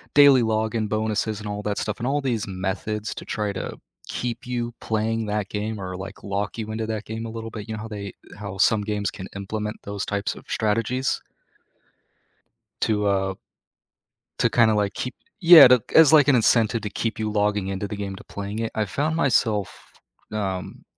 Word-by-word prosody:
daily 140 -3 +8
login 110 0 0
bonuses 110 0 -1
and 105 - -7
all 105 0 -3
that 105 -1 -2
stuff, 105 - -3
and 120 - -2
all 145 +2 +1
these 120 -6 -1
methods 100 +3 -3
to - - -7
try 105 -2 -2
to 90 - -5 0.3
keep 120 0 -4
you 120 -1 -2
playing 110 0 -1
that 105 -1 -2
game 105 0 -3
or, 95 -1 -5
like, 95 +2 -8
lock 100 +2 -3
you 110 -1 -4
into 110 0 -3
that 110 -1 -3
game 110 +1 -5
a 115 - -5
little 115 0 -6
bit, 110 0 -7
you 110 - -3
know 105 - -6
how - - -6
they 100 -2 -6 0.3
how 100 -2 -6
some 105 +2 +4
games 105 -1 -2
can 95 -2 -8
implement 105 +2 -4
those 100 -1 -4
types 100 -1 -2
of - - -13
strategies 115 +4 0 1.6
to, 105 -2 +1
uh, 95 -1 +1 1.1
to, 115 - +3
kinda, 110 -1 +4
like, 105 -1 0
keep 125 0 -4 0.3
yeah, 165 -5 +11
to 125 -2 +6
as, 160 -2 +8
like, 145 -3 +7
an 140 - +6
incentive 115 -1 +3
to 105 - -4
keep 115 +2 -3
you 110 -1 -1
logging 105 -2 +1
into 100 +1 -3
the 105 - -5
game 100 -1 -4
to - - -11
playing 100 +2 -5
it. 115 - -2
I've 110 -3 -1
found 155 +7 0
myself, 115 - +2 0.6
um, 95 -3 -4
110 Hz, 195 wpm, -24 LUFS, 100-115 Hz, 1.6 s, yeah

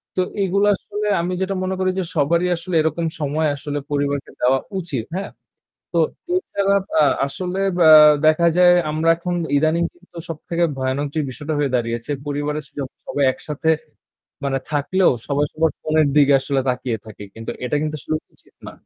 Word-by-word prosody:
তো 185 - +2 0.2
এগুলো 200 +2 +2
আসলে 210 +1 -5
আমি 180 +2 -2
যেটা 190 +1 -1
মনে 190 0 -1
করি 185 0 +1
যে - - 0
সবারই 170 +4 +2
আসলে 170 +1 -5
এরকম 160 +2 -1 0.2
সময় 150 +2 0
আসলে 145 +1 -4
পরিবারকে 145 -1 -1
দেওয়া 130 +2 +3 0.2
উচিত। 140 -10 -4
হ্যাঁ। 195 +1 -4 0.6
তো 170 - +1 0.4
এছাড়া 200 - 0 0.3
আ - - +6 0.2
আসলে 180 +6 -4 0.3
আ - - +9 0.4
দেখা 155 +2 +4
যায় 175 0 +7 0.2
আমরা 160 +2 0
এখন 175 +1 -3 0.2
ইদানিং 160 +3 +2
কিন্তু 175 -1 -15
সবথেকে 170 +2 -2
ভয়ানক 130 +2 -1 0.2
বিষয়টা 150 +4 -5
হয়ে 145 -3 +1
দাঁড়িয়েছে। 115 +2 -3 0.2
পরিবারের 145 +1 -2 0.4
সবাই 145 - 0
একসাথে 150 +3 -2 0.7
মানে 135 -1 0
থাকলেও 175 +6 +2 0.2
সবাই 145 +1 +1
সবার 160 0 +1
ফোনের 155 -1 +2
দিকে 145 -1 +6
আসলে 135 0 -1
তাকিয়ে 125 -2 -1
থাকি। 105 -1 -10
কিন্তু 115 0 -6
এটা 135 +4 0
কিন্তু 155 0 -2
আসলে 155 - -3 0.2
উচিত - - -27
না। - - -9
155 Hz, 160 wpm, -21 LUFS, 140-175 Hz, 0.7 s, আ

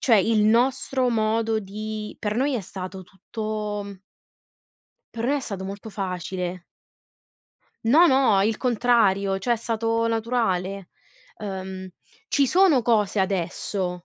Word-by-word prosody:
cioè 235 -4 +5
il 215 +2 +3
nostro 255 +3 +2
modo 225 0 +1
di 215 +1 -6
per 210 0 -2
noi 270 +4 +1
è 230 - -2
stato 185 +1 -7
tutto 205 +1 -5 1.2
per 230 0 -4
noi 270 +4 +2
è - - -2
stato 200 -7 -5
molto 200 +3 -7
facile. 180 -2 -4 1.2
No, 300 +10 +6
no, 260 - +4
il 215 +2 0
contrario, 215 -6 +2
cioè 240 +5 +1
è - - -4
stato 230 0 -1
naturale. 215 -5 -1 0.5
Uhm, 190 -2 -6 0.4
ci 280 -1 +3
sono 350 -4 +4
cose 215 -3 +2
adesso, 180 -1 -2
215 Hz, 125 wpm, -24 LUFS, 195-235 Hz, 1.2 s, No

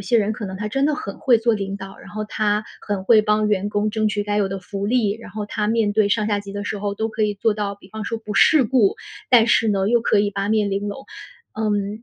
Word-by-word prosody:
些 230 +4 +2
人 215 0 +1
可 215 - -6
能 190 - -6
他 210 +2 -4
真 270 +6 0
的 300 - +2
很 200 -10 -6
会 245 -3 +4
做 230 0 +2
领 195 -1 -4
导， 195 0 -9
然 - - -13
后 215 0 -4
他 210 0 0 0.2
很 200 -2 -3
会 215 +1 +6
帮 210 0 +2
员 205 -1 0
工 205 +1 0
争 215 0 0
取 205 0 -2
该 205 0 -1
有 200 -2 +1
的 195 0 -4
福 195 +2 -6
利。 225 -3 +2
然 - - -11
后 210 0 -5
他 210 0 -2
面 220 -2 +1
对 210 -1 +2
上 215 0 +1
下 205 -1 0
级 200 -1 -9
的 205 0 -5
时 205 - -3
候 205 0 -2
都 220 +2 -2
可 220 0 -3
以 210 -1 +1
做 220 +1 +1
到， 205 -1 -3
比 190 - -18
方 220 +1 -6
说 230 +2 -3
不 210 -2 -7
世 310 -5 +5
故， 225 -4 +2 0.3
但 235 -3 +6
是 225 -1 +3
呢 195 -1 +1
又 235 +1 +3
可 225 - +2
以 205 0 +2
八 200 0 -3
面 210 -2 +1
玲 200 +1 -2
珑。 270 +7 -7 0.5
嗯， 210 0 -1
210 Hz, 300 characters per minute, -21 LUFS, 200-220 Hz, 0.5 s, 会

